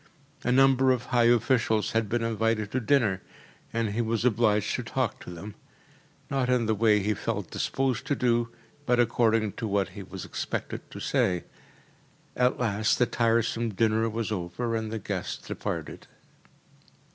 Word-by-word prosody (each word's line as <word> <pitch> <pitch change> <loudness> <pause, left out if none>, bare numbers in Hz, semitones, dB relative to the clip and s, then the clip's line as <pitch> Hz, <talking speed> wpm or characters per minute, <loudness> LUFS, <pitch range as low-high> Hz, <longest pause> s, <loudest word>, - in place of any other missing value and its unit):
A 125 - +1
number 135 0 +5
of 125 -1 0
high 120 -2 +2
officials 115 -2 +2
had 110 -2 0
been 120 +1 0
invited 110 -1 0
to 130 - 0
dinner, 115 -7 +2 0.5
and 115 -1 0
he 115 +3 0
was 115 0 -1
obliged 110 -3 +2
to - - -3
talk 125 0 -2
to - - -9
them: 90 +4 -8 0.7
not 135 -2 0
in 125 -2 +2
the 110 - +2
way 105 -1 +3
he 105 +2 +1
felt - - -4
disposed 130 -3 -1
to 145 - +1
do, 120 -2 +1 0.4
but 125 0 +3
according 115 -3 +2
to 115 - -5
what 100 -2 0
he 100 +2 -9
was 95 - -8
expected - - -5
to - - -9
say. 90 -2 +1 0.9
At 125 0 +2
last 110 -2 +1
the 125 - +4
tiresome 115 -1 0
dinner 110 +1 +2
was 110 0 -3
over, 105 +5 -2
and 110 -1 -3
the 115 - -2
guests 105 - -5
departed. - - -5
115 Hz, 165 wpm, -27 LUFS, 105-120 Hz, 0.9 s, number